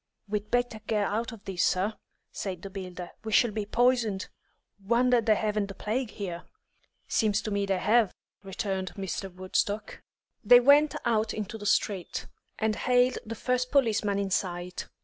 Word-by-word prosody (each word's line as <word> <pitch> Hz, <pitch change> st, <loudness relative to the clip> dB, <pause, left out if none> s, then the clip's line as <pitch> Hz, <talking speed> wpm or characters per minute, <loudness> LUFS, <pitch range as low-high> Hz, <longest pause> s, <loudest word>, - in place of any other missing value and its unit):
"We'd 210 Hz, 0 st, -3 dB
better 245 Hz, -2 st, 0 dB
get 210 Hz, -2 st, +1 dB
out 225 Hz, +5 st, -2 dB
of 225 Hz, -3 st, -12 dB
this, 185 Hz, -2 st, -1 dB
sir," 195 Hz, +4 st, +1 dB, 0.4 s
said 185 Hz, -4 st, -5 dB
the 195 Hz, -, -7 dB
builder. 180 Hz, -2 st, -7 dB
"We 220 Hz, -, -4 dB
shall 235 Hz, +1 st, +4 dB
be 210 Hz, -1 st, -3 dB
poisoned. 235 Hz, -4 st, +1 dB, 0.5 s
Wonder 240 Hz, +3 st, +3 dB
they 215 Hz, -1 st, +3 dB
haven't 210 Hz, -1 st, 0 dB
the 195 Hz, -, -9 dB
plague 235 Hz, +3 st, -2 dB
here." 180 Hz, -5 st, -5 dB, 0.7 s
"Seems 215 Hz, -2 st, +2 dB
to 215 Hz, -, -3 dB
me 200 Hz, 0 st, 0 dB
they 195 Hz, -1 st, +1 dB
have," 215 Hz, +1 st, +3 dB, 0.3 s
returned 190 Hz, -1 st, -3 dB
Mr. 195 Hz, 0 st, -4 dB
Woodstock. 185 Hz, +3 st, -2 dB, 0.4 s
They 245 Hz, +3 st, +8 dB
went 285 Hz, +3 st, +5 dB
out 220 Hz, -2 st, +1 dB
into 215 Hz, 0 st, -4 dB
the 205 Hz, -, -4 dB
street, 195 Hz, -3 st, 0 dB, 0.3 s
and 220 Hz, 0 st, 0 dB
hailed 250 Hz, +2 st, +2 dB
the 230 Hz, -, -4 dB
first 250 Hz, +2 st, 0 dB
policeman 220 Hz, -7 st, +2 dB
in 200 Hz, -1 st, -2 dB
sight. 180 Hz, -1 st, -2 dB
210 Hz, 165 wpm, -28 LUFS, 195-235 Hz, 0.7 s, They